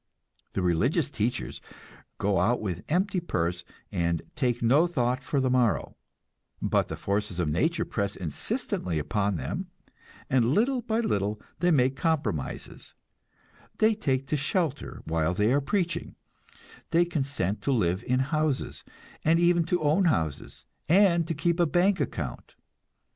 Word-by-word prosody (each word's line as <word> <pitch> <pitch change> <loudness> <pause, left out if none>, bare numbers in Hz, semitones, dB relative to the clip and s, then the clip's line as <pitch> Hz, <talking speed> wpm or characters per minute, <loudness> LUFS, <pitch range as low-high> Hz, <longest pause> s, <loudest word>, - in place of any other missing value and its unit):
The 95 - -1
religious 125 - +1
teachers 115 0 -2 0.6
go 100 -2 +1
out 115 +7 +2
with 90 -4 -4
empty 185 +4 +1
purse, 90 - -2 0.3
and 85 -1 0
"take 120 -3 0
no 140 +9 +5
thought 130 -6 0
for 140 +1 0
the 130 -1 +1
morrow"; 125 -4 +1 0.6
but - - +1
the - - -5
forces 100 -2 -2
of 90 -3 0
nature 160 - +1
press 100 -2 -2
insistently 85 +1 -2
upon 100 +7 0
them, 185 - -4 0.6
and 130 0 +2
little 250 +3 +2
by 230 -1 0
little 105 - -1 0.2
they 175 +2 +3
make 135 -4 +3
compromises, 150 - -3 0.8
they 220 +1 +4
take 135 -10 -1
to - - +1
shelter 150 0 -2
while 80 +2 0
they 105 +5 +2
are 145 - +3
preaching, 175 +4 -2 0.7
they 170 +1 +4
consent 135 - -2
to 140 - 0
live 95 -6 +1
in 130 +1 +2
houses, 155 0 -1 0.4
and 165 +2 +4
even 175 0 +4
to 175 -1 0
own 155 +6 +3
houses, 80 - -1 0.2
and 170 -2 +5
to 165 - -2
keep 170 +3 0
a 170 - +4
bank 185 +4 +2
account. - - -4
135 Hz, 145 wpm, -27 LUFS, -, 0.8 s, no